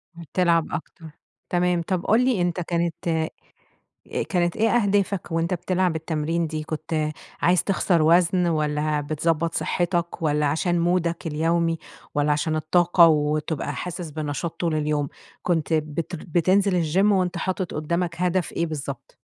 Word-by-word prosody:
بتلعب 170 0 +1
أكتر، 165 +1 -6 0.4
تمام، 175 -1 +1
طب 180 +1 -2
قُل 235 +4 +4
لي 245 -8 +2
أنت 175 0 0
كانت 170 -1 -1
أ 160 -1 +1 1.0
كانت 175 -2 +1
إيه 225 +1 +3
أهدافك 200 -5 +1
وأنت 165 +2 0
بتلعب 180 -1 0
التمرين 160 +1 -1
دي؟ 155 0 -4
كنت 155 0 -2 0.3
عايز 180 +1 +3
تِخسر 180 -3 +2
وزن 175 +2 +4
والّا 150 -2 0
بتضبّط 160 +2 0
صحتك 175 -2 -1
والّا 150 -1 +1
علشان 170 +4 +1
مودَك 170 -1 0
اليومي، 165 +2 +1 0.4
والّا 145 0 +2
علشان 155 +2 0
الطاقة 170 +2 +5
وتبقى 150 -1 0
حاسس 175 0 -5
بنشاط 155 +2 -4
طول 165 -3 0
اليوم، 150 -1 0 0.4
كنت 165 -2 0
بتر 155 +2 -2
بتنزل 185 +3 +2
الجيم 180 +5 +3
وأنت 185 -2 +1
حاطِط 185 0 -2
قدامك 170 +2 -1
هدف 180 -1 +1
إيه 170 - -1
بالضبط؟ 140 -5 -6
170 Hz, 140 wpm, -24 LUFS, 155-180 Hz, 1.0 s, الطاقة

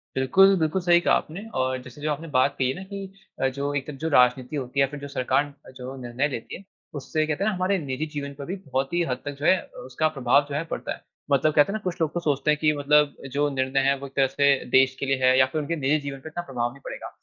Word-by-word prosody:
बिल्कुल, 195 +10 +5
बिल्कुल 160 +4 0
सही 175 -1 +5
कहा - - +4
आपने 180 +7 -2 0.2
और 130 0 -1
जैसे 130 +3 -12
जो 150 0 -1
आपने 155 +3 -4
बात 130 +2 +3
कही 130 - +1
है 130 - -2
ना 190 - -7
कि 200 - -5 0.4
अ, 135 - +3
जो 140 +2 -3
एक 140 0 -3
जो 160 - 0
राजनीति 125 0 +3
होती 135 -1 -3
है - - +6
या - - -6
फिर 145 - -7
जो 140 - -7
सरकार 135 +2 0 0.2
जो 130 +1 -7
निर्णय 125 +4 -1
लेती 125 -6 -6
है 195 - -15 0.3
उससे 155 +2 -1
कहते 155 +5 -1
हैं 215 - +2
ना 210 - -2
हमारे 185 +2 +1
निजी 140 -2 -3
जीवन 140 -1 -4
पर 140 0 -8
भी 185 - -4
बहुत 135 +2 -2
ही 175 - +2
हद 125 - -1
तक 145 - -2
जो 145 - -4
है 185 - +6
अ, - - -17
उसका 155 - 0
प्रभाव 135 +3 +3
जो 140 - -4
है 150 - -1
पड़ता - - -3
है। - - -13 0.3
मतलब 145 +2 +3
कहते 145 +6 +4
हैं - - -4
ना - - -8
कुछ 180 -2 -2
लोग 155 -2 0
तो 175 - -1
सोचते 150 -2 +1
है - - +3
की 155 0 +4
मतलब 150 0 +3 0.2
जो 145 +1 +1
निर्णय 130 +1 +1
है 140 - +2
वो 140 - -7
एक 135 - -18
तरह 135 -1 +4
से 140 +2 +1 0.3
देश 130 0 +4
के - - -2
लिए 135 0 +1
है 130 0 +5
या 130 - +7
फिर 150 +4 -3
उनके 160 +3 -2
निजी 150 0 +1
जीवन 135 -1 -5
पे 160 - -8
इतना 175 +2 -5
प्रभाव 120 -2 -1
नहीं 140 - -17
पड़ेगा - - -6
140 Hz, 290 wpm, -25 LUFS, 130-155 Hz, 0.4 s, या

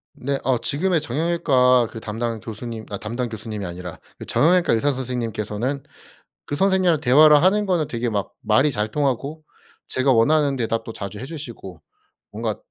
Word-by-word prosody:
네 140 +1 -2
어 130 0 +2
지금의 165 +8 0
정형외과 135 -5 +2
그 115 - -7
담당 115 +1 -3
교수님 110 +1 -7
아 100 - -4
담당 120 +4 -4
교수님이 110 -2 -6
아니라 90 0 -7 0.2
그 - - -8
정형외과 175 0 +3
의사 130 +6 +2
선생님께서는 125 0 -3 0.6
그 - - -3
선생님이랑 185 -2 +3
대화를 150 +3 +6
하는 205 +3 +3
거는 175 -6 0
되게 120 0 -2
막 100 -3 -2
말이 125 +4 +3
잘 105 -5 -2
통하고 140 +4 -2 0.5
제가 130 +1 +2
원하는 140 +4 +3
대답도 115 -2 -2
자주 100 -1 -6
해 125 - -6
주시고 120 - -8 0.5
뭔가 110 -1 -3
125 Hz, 360 characters per minute, -22 LUFS, 110-150 Hz, 0.6 s, 대화를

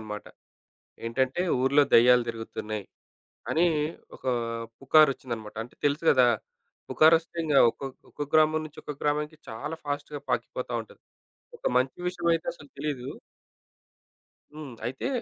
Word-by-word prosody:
అనమాట. 105 -1 -7 0.8
ఏంటంటే, 130 +7 0 0.2
ఊర్లో 140 +3 +5
దెయ్యాలు 125 +1 +7
తిరుగుతున్నాయి. 110 -2 -5 0.6
అని 165 +2 +3 0.5
ఒక - - -19 0.6
పుకారొచ్చిందన్నమాట. 130 -6 +2
అంటే 120 - -15
తెలుసు 145 +3 +1
గదా! 130 -2 +6 0.6
పుకారొస్తే 160 +2 +4
ఇంగ 155 -2 -1 0.2
ఒక్క 115 - -12 0.3
ఒకొక్క 145 -1 -6
గ్రామం 155 0 +4
నుంచి 155 - -11
ఒక - - -5
గ్రామానికి 150 +1 -1
చాలా 140 +8 -5
ఫాస్ట్‌గా 145 0 -4
పాకిపోతా 125 +1 -2
ఉంటది. 110 - -17 0.6
ఒక - - -16
మంచి 130 +1 0
విషయమైతే 170 -2 0
అసలు 145 -4 -15
తెలీదు. 140 -3 -3 1.5
హ్మ్. 150 -4 -8
అయితే 130 - -3
140 Hz, 120 wpm, -27 LUFS, 125-155 Hz, 1.5 s, దెయ్యాలు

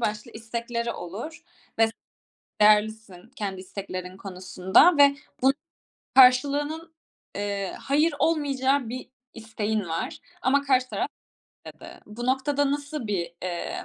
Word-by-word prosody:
başlı 210 -2 -2
istekleri 235 +1 -4
olur 210 - -7 0.4
ve 225 - +6
s 225 - -6 0.7
değerlisin 210 -2 +2
kendi 200 -7 -4
isteklerin 185 -1 -7
konusunda 190 - +3
ve 280 -1 +6 0.3
bun 265 +1 +5 0.6
karşılığının, 290 +5 +4 0.4
eee, 200 -1 -3
hayır 300 +3 +2
olmayacağı 280 -5 +1
bir 250 +2 -7 0.2
isteğin 220 -1 -2
var 165 0 -4 0.2
ama 280 +2 +3
karşı 255 -2 +2
taraf - - -2 0.6
dedi. - - -11
Bu 235 +3 -6
noktada 275 +2 +1
nasıl 285 -3 -3
bir, 175 -5 -2
eee, 175 -2 -4
235 Hz, 115 wpm, -26 LUFS, 205-280 Hz, 0.7 s, ve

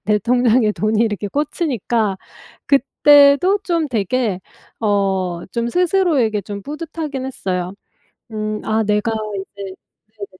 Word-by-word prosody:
내 210 0 +2
통장에 235 -1 +2
돈이 215 +1 0
이렇게 210 -3 0
꽂히니까 240 - -1 0.5
그때도 285 - +5
좀 335 -4 0
되게 220 -3 -1 0.4
어 190 -4 0
좀 235 0 -1
스스로에게 325 - +2
좀 200 +1 -7
뿌듯하긴 300 - -5
했어요. 185 -7 -3 0.6
음. 215 0 -3
아. 220 +1 +1
내가 210 +1 0 0.2
이제 195 0 -7 0.4
네네 200 - -6
225 Hz, 240 characters per minute, -19 LUFS, 205-280 Hz, 0.6 s, 그때도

